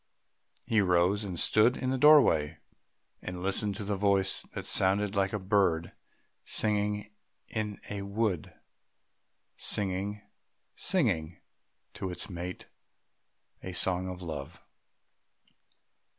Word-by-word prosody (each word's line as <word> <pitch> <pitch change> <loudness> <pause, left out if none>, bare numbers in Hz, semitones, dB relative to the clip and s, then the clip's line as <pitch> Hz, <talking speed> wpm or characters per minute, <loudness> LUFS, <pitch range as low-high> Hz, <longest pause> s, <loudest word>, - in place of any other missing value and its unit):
He 110 -2 +2
rose 90 +2 +2
and 90 -4 -5
stood 110 +4 +3
in 130 -1 -2
the 130 - 0
doorway, 85 - +5 0.6
and 90 -1 -6
listened 100 +1 +3
to 105 - -5
the 100 0 -2
voice 95 -1 +2
that - - -6
sounded 100 +2 +2
like 95 -1 +1
a - - -2
bird 95 -4 +1 0.5
singing 105 0 0 0.4
in 105 -2 -4
a 100 -1 -5
wood, 100 -4 -2 1.1
singing, 100 +1 +1 0.5
singing 90 - 0 0.5
to 95 - -5
its 90 +2 -6
mate 90 +1 -6 1.0
a 95 - -7
song 90 +1 0
of 90 0 -8
Love. 75 -5 -7
100 Hz, 110 wpm, -29 LUFS, 90-105 Hz, 1.1 s, doorway